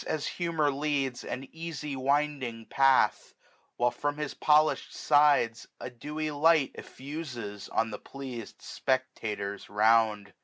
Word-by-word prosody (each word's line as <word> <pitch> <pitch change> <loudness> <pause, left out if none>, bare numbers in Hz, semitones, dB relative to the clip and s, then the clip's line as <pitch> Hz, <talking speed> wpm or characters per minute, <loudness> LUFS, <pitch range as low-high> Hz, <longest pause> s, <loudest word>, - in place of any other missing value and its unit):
As 155 - -2
humour 165 -4 0
leads, 135 -3 -1
an 135 +1 -5
easy 155 -3 -5
winding 135 -4 -1
path; 135 +1 +3 0.4
While, 120 0 +2
from 145 +4 -2
his 150 -2 -3
polished 155 +1 +2
sides, 145 -6 +3
a 125 - -6
dewy 150 +5 -4
light 150 -1 +3
Eflfuses 125 -9 -7
on 115 0 0
the 105 - -6
pleas'd 130 -5 -8
spectators 105 -6 -3
round. 105 -1 +3
135 Hz, 120 wpm, -29 LUFS, 115-150 Hz, 0.4 s, path